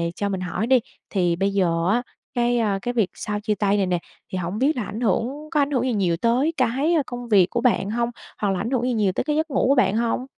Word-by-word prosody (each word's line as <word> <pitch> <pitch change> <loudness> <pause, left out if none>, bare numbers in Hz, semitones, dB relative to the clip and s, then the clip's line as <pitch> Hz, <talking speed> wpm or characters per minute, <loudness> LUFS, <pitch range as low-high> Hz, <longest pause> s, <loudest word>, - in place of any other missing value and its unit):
cho 200 0 -2
mình 190 -2 -3
hỏi 185 +5 -2
đi, 260 -1 +5 0.3
thì 175 -4 +1
bây 195 +2 0
giờ 170 -3 +1
á, 245 +3 +1 0.3
cái, 240 0 +1
a, 200 -3 +1
cái 245 - -2
việc 220 -6 +1
sau 210 -1 -4
chia 210 0 -1
tay 205 0 +1
này 195 - +2
nè, 180 -1 0 0.3
thì 185 - -2
hổng 180 +3 -3
biết 280 +3 +2
là 230 - -1
ảnh 215 +4 -6
hưởng 255 +8 -1
có 300 - +2
ảnh 285 +1 0
hưởng 255 -3 +1
gì 255 -2 0
nhiều 180 -5 +1
tới 250 - +1
cái 270 +7 +2
công 245 -1 -6
việc 195 -5 +5
của 240 - -1
bạn 235 -5 +2
hông? 235 +1 0 0.3
Hoặc 205 - +1
là 185 - -1
ảnh 225 +6 -2
hưởng 245 -2 +1
gì 250 -1 +1
nhiều 205 -4 +2
tới - - -2
cái 300 0 -1
giấc 315 +1 0
ngủ - - +2
của 280 - +5
bạn 220 -5 +3
hông? 235 +2 0
230 Hz, 275 wpm, -23 LUFS, 195-250 Hz, 0.3 s, đi